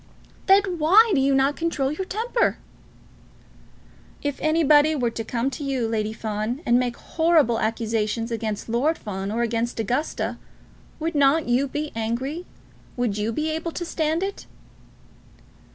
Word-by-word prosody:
"Then 385 -3 +4
why 410 +9 +6
do 280 - +3
you 275 0 +3
not 270 +2 +2
control 300 -5 -1
your 375 +6 -3
temper?" 465 +5 0 1.7
"If 285 -1 -2
anybody 310 -1 +4
were 245 -5 0
to 225 - -4
come 240 +4 -2
to 275 - -6
you, 265 -4 -1
Lady 215 -1 -1
Fawn, 220 +4 -3
and 240 +1 +4
make 245 -1 -1
horrible 320 -9 +2
accusations 225 0 -1
against 220 -2 -3
Lord 260 +8 +1
Fawn, 195 -1 -5
or 235 +2 0
against 230 0 -2
Augusta, 250 +8 -2 0.6
would 325 +1 -2
not 285 +1 +3
you 250 +3 +2
be 295 +2 -4
angry? 255 +10 -3 0.5
Would 230 -4 -1
you 215 +2 -1
be 305 +6 -1
able 320 +1 -3
to 345 - -4
stand 320 +1 -1
it?" 395 0 -5
270 Hz, 150 wpm, -24 LUFS, 230-315 Hz, 1.7 s, why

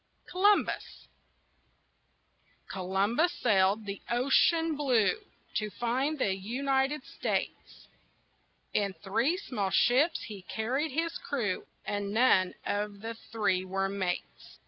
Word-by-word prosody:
COLUMBUS 405 +3 +1 1.6
Columbus 200 - +1
sailed 195 +1 +3
over - - -13
the 200 0 -5
ocean 300 +6 +3
blue 255 -8 +3 0.5
To 215 -1 -1
find 250 +8 -1
the 195 -8 +1
United 270 +8 0
States. - - -4 0.9
In 200 -2 +1
three 225 - 0
small 210 - -2
ships 275 - +3
he 205 -3 -8
carried 245 +11 -2
his 330 +4 -2
crew, 230 -10 -2 0.2
And 205 -1 -2
none 190 -6 +4
of 205 0 -2
the 225 +1 -4
three 210 -5 -1
were 195 +1 -1
mates. 190 -3 -4
225 Hz, 110 wpm, -30 LUFS, 195-275 Hz, 1.6 s, none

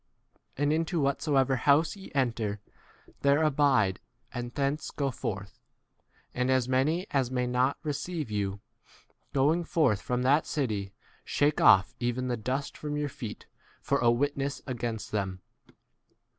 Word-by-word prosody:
And 145 +2 +2
into 165 +2 0
whatsoever 140 -2 +2
house 145 - +3
ye 195 - -11
enter, 115 -6 0 0.6
there 140 +3 +4
abide 135 -10 +3 0.3
and 120 -1 -4
thence 140 +3 -1
go 140 -2 -2
forth. 100 -4 -5 0.7
5 125 - -3
And 125 - +1
as 130 -2 +2
many 145 +8 +1
as 135 -3 +1
may 125 -1 0
not 125 +2 +1
receive 155 -2 -3
you, 100 -1 -2 0.7
going 150 +6 +2
forth 150 - +2
from 125 0 -1
that 145 +4 +3
city, 105 -9 -2 0.3
shake 145 +1 +1
off 95 +5 +6
even 125 +1 -1
the 120 - +1
dust 130 +5 -3
from 150 -1 -3
your 150 -1 -1
feet 115 -5 -7 0.3
for - - 0
a 120 - +4
witness 140 +3 0
against 120 -4 -4
them. 95 -3 -3
130 Hz, 145 wpm, -29 LUFS, 120-145 Hz, 0.7 s, off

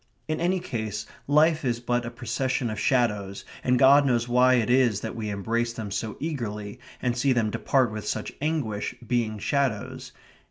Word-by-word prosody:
In 155 - -1
any 180 +2 +2
case 110 - -4 0.2
life 155 +2 +4
is 120 -3 0
but 120 0 -1
a - - -2
procession 125 0 -2
of 105 - -4
shadows, 105 -6 0 0.2
and 125 0 +3
God 140 +3 +7
knows 120 -3 +1
why 125 +1 +5
it 115 -4 +1
is 120 -5 +3
that 110 - -5
we 110 -2 -4
embrace 115 +4 -1
them 110 -3 -6
so 110 +2 -3
eagerly, 115 -8 -4 0.2
and 125 -2 +1
see 130 +2 +2
them 115 -3 +1
depart 130 -1 +1
with 105 0 -6
such 110 - -3
anguish, 140 -10 -2
being 115 -2 0
shadows. 130 +1 -1
120 Hz, 175 wpm, -26 LUFS, 110-130 Hz, 0.2 s, God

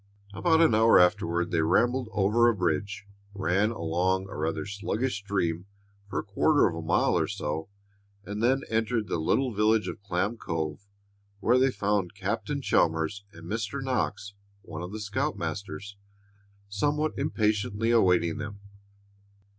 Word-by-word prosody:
About 160 - +3
an 165 - +5
hour 110 +1 +6
afterward 85 -1 +2
they 85 -2 +2
rumbled 120 +9 +2
over 105 +4 +3
a 115 - +1
bridge, 95 +3 -2 0.3
ran 100 +2 +1
along 95 -1 -1
a - - -8
rather 80 +4 -2
sluggish 105 +4 -2
stream 95 -3 -2 0.4
for - - -4
a - - -1
quarter 145 +9 +3
of 85 - -3
a 85 - -5
mile 80 - +2
or - - +1
so, 80 +4 -4 0.6
and 105 +1 -5
then 130 +3 +2
entered 110 -1 0
the - - -2
little 125 +10 +1
village 105 +1 +2
of 105 - -6
Clam 100 +3 -1
Cove, 80 0 -4 0.5
where 120 +5 +3
they 135 +1 +4
found 100 -6 -1
Captain - - -3
Chalmers 80 +5 +1
and 80 -2 -13
Mr. 110 +7 -3
Knox, 125 -6 -2 0.3
one 80 - -7
of 90 +1 -6
the 110 - -6
scoutmasters, 100 -1 -4 0.7
somewhat 145 +9 0
impatiently 105 +1 0
awaiting 90 -4 +3
them. 105 -2 -6
100 Hz, 145 wpm, -27 LUFS, 90-115 Hz, 0.7 s, hour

